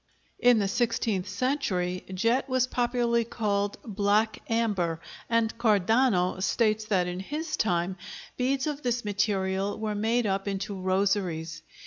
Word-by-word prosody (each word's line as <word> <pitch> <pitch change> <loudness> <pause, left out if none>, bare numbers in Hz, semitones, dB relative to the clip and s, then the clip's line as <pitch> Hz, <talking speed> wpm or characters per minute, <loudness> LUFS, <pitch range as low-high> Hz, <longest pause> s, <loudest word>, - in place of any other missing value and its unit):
In 245 -1 +5
the 200 -2 +1
sixteenth 220 -3 0
century 190 -6 -1
jet 230 +8 +1
was 255 -1 +2
popularly 240 -2 +1
called 205 -3 -1
"black 210 +1 +1
amber," 200 -8 0 0.3
and 230 -1 +1
Cardano 210 -3 +2
states 215 +1 +1
that 190 -4 +1
in 180 0 -4
his 305 - -3
time 180 - 0 0.4
beads 260 +1 0
of 300 -1 -3
this 240 -3 -1
material 195 -1 0
were 215 -1 -2
made 225 +3 +1
up 195 0 -1
into 200 +1 -3
rosaries. 185 -4 0
210 Hz, 130 wpm, -27 LUFS, 190-235 Hz, 0.4 s, In